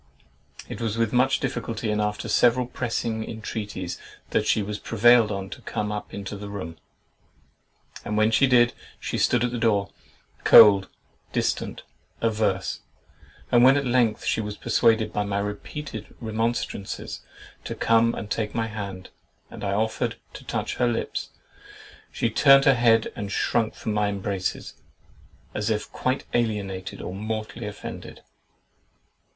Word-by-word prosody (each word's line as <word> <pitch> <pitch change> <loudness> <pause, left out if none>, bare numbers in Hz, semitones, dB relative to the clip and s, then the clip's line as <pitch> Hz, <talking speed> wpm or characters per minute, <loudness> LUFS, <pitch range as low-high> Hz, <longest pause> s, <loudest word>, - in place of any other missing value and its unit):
It - - -7
was 115 -1 -2
with 115 -1 0
much 130 +2 +3
difficulty 115 -2 -3
and 105 0 0
after 105 0 -2
several 125 +1 +3
pressing 115 -2 -2
intreaties 105 -5 -5 0.3
that - - +1
she 110 - +2
was 105 +1 -5
prevailed 115 0 +4
on 100 -1 -4
to - - -8
come 105 0 -3
up 105 0 -5
into 100 +1 -6
the 100 0 -7
room; 85 -5 -6 1.3
and 105 - -3
when 110 +1 +3
she 135 +5 +4
did, 120 -2 +4 0.3
she - - -3
stood 120 -1 +3
at 120 - 0
the 120 - -3
door, 100 -4 +1 0.5
cold, 100 -3 +8 0.5
distant, - - -1 0.4
averse; 105 -4 0 0.7
and 120 0 +6
when 135 +2 +7
at 140 - -1
length 120 -3 +1
she - - +1
was 105 -1 -5
persuaded 110 -1 +2
by 105 - 0
my 100 -1 -2
repeated 105 +3 -5
remonstrances 115 -2 -3 0.4
to - - -5
come 115 +1 +3
and 105 - -7
take 105 -2 -2
my 115 -1 0
hand, 100 -4 -7 0.4
and - - -9
I 100 -1 -1
offered 110 +2 -1 0.2
to - - -10
touch - - -3
her 125 - +2
lips, 120 -1 -2 0.8
she 115 - -1
turned 135 +2 +6
her 135 - +7
head 115 -2 +3
and 100 -1 -5
shrunk 115 +1 0
from 110 - -3
my 105 0 +1
embraces, 100 -2 -3 0.8
as 105 +1 -2
if 105 -1 -2
quite 130 +1 -1
alienated 100 -5 -2
or 90 - -5
mortally 110 +2 -4
offended. 105 - -8
110 Hz, 150 wpm, -25 LUFS, 105-120 Hz, 1.3 s, cold